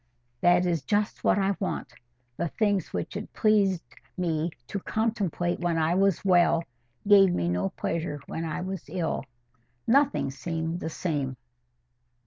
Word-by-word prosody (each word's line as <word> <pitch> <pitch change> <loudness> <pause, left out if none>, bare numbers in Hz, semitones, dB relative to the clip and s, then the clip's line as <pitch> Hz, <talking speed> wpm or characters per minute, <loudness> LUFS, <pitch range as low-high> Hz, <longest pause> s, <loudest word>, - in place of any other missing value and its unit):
"That 175 +3 +4
is 170 -4 +1
just 205 +9 -1
what - - +4
I 195 0 +1
want. 190 - -3 0.4
The 170 - -1
things 205 0 0
which - - -4
it 210 +1 -5
pleased 200 -5 +3 0.3
me 165 -2 0 0.2
to 200 - -4
contemplate 195 -5 -1
when 175 -2 0
I 160 +1 +2
was 195 0 +2
well, 175 -2 +4 0.4
gave 195 -2 +7
me 85 - 0
no 90 +2 0
pleasure 160 - -3
when 165 - -4
I 160 +1 -3
was 190 -1 -5
ill. 170 -3 -1 0.6
Nothing 275 - +3
seemed 165 +4 -3
the 160 - -3
same." 145 -6 -2
175 Hz, 145 wpm, -27 LUFS, 160-195 Hz, 0.6 s, gave